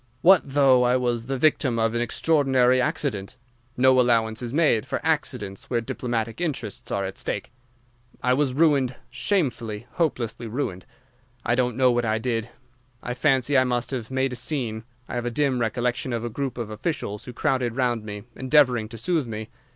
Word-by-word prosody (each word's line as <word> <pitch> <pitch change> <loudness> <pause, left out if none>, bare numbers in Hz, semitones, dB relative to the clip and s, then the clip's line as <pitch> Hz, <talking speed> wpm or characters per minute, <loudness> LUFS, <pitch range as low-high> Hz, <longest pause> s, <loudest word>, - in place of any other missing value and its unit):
What 190 +2 +7
though 135 -2 +4
I 125 0 +3
was 120 -2 -1
the 135 0 -1
victim 130 -3 +2
of 115 0 +1
an 120 - 0
extraordinary 130 -1 +3
accident? 130 - -2 0.4
No 130 +1 +5
allowance 115 -2 +2
is 120 -1 -4
made 145 -7 +3
for - - -3
accidents 125 -11 -2
where 120 - +1
diplomatic 115 +2 -3
interests 140 - -4
are 100 -1 -1
at 95 - -5
stake. - - -3 0.7
I 125 +1 +3
was 130 -1 +1
ruined, 140 -5 +3 0.2
shamefully, 120 - -1
hopelessly 120 -8 -2
ruined. 110 -6 -4 0.6
I 120 - +2
don't 125 -1 0
know 130 -1 +5
what 120 0 +1
I 110 -1 +1
did. 115 -1 -2 0.5
I 125 - -3
fancy 135 0 +2
I 130 - +6
must 125 -1 -1
have 120 -5 -4
made 130 0 0
a - - -3
scene. 120 -3 -2 0.2
I - - -7
have 120 0 -2
a - - +1
dim 130 0 0
recollection 120 +2 -1
of 115 0 -2
a - - -2
group 135 +1 -3
of 115 -3 -4
officials 105 -2 -4
who 125 - -7
crowded 120 -1 0
round 120 -4 0
me, 105 -1 -7
endeavouring 130 -5 +3
to 115 - -9
soothe 155 +3 0
me. 110 -1 -6
125 Hz, 180 wpm, -24 LUFS, 115-135 Hz, 0.7 s, What